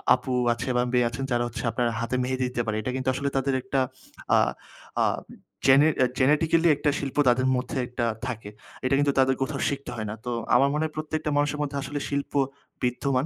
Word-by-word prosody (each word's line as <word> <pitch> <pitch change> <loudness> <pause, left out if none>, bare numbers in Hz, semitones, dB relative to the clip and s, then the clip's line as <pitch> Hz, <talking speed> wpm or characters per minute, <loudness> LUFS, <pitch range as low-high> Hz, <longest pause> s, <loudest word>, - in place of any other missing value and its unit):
আপু 130 - -4 0.2
আছে 120 +3 -5
বা 125 - +3
মেয়ে 125 -1 +4
আছেন 120 +3 -5
যারা 120 0 +2
হচ্ছে 120 +2 -6
আপনার 120 +2 0
হাতে 115 +2 -2
মেহেদী 130 0 -1
দিতে 120 - -2
পারে। 110 -1 -1
এটা 125 - -3
কিন্তু 130 0 -1
আসলে 140 +2 -1
তাদের 135 0 +1
একটা 135 +1 0 0.6
আ - - +6 0.7
আ - - +4 0.6
জেনে 135 +3 +7 0.3
জেনেটিক্যালি 160 +5 +3
একটা 145 +1 +1
শিল্প 140 -2 -4
তাদের 130 +2 +3
মধ্যে 125 +2 -3
একটা 120 -1 -2 0.2
থাকে। 115 -4 -5 0.4
এটা 135 +1 +3
কিন্তু 145 -1 +2
তাদের 130 0 +4
কোথাও 140 +1 -2
শিখতে 140 -1 -5
হয় 110 -1 -4
না। 105 - -4
তো 125 - -2 0.2
আমার 140 - +5
মনে 150 +1 0
হয় 155 - -5
প্রত্যেকটা 155 0 -2
মানুষের 145 +1 +1
মধ্যে 140 -1 -3
আসলে 145 +2 -4
শিল্প 140 0 -3 0.5
বিদ্যমান। 130 +2 +1
130 Hz, 200 wpm, -26 LUFS, 125-145 Hz, 0.7 s, জেনে